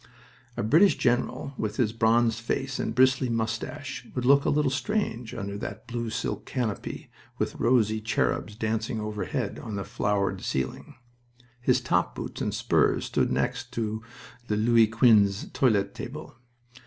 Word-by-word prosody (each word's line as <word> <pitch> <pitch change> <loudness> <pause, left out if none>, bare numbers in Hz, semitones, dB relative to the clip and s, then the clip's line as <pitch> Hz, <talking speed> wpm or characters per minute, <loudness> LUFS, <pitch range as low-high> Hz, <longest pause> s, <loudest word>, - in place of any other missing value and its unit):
A - - -1
British 160 - +5
general, 125 +3 0
with 105 -1 -2
his 110 -4 +1
bronzed 115 0 +3
face 135 +3 -2
and 110 - -2
bristly 130 0 +4
mustache, 115 +5 -3
would 125 -1 -1
look 140 +2 +5
a - - +3
little 150 -2 +2
strange 130 - -2
under 100 -3 -4
that 105 +3 -6
blue 115 -1 -3
silk 110 -1 -3
canopy, 120 -6 -4 0.3
with - - -1
rosy 110 -3 +2
cherubs 105 -1 -1
dancing 110 0 -2
overhead 105 +2 -3
on 110 -3 -6
the 100 - -3
flowered 100 -2 -1
ceiling. 65 0 -3 0.7
His - - +3
top - - 0
boots - - -6
and - - 0
spurs - - +2
stood - - 0
next 65 +1 -1
to 110 -1 -2 0.5
a 105 - +1
Louis 115 +1 +4
Quinze 110 -4 +3
toilet 100 -6 +2
table. 135 0 -8
115 Hz, 150 wpm, -27 LUFS, 105-125 Hz, 0.7 s, British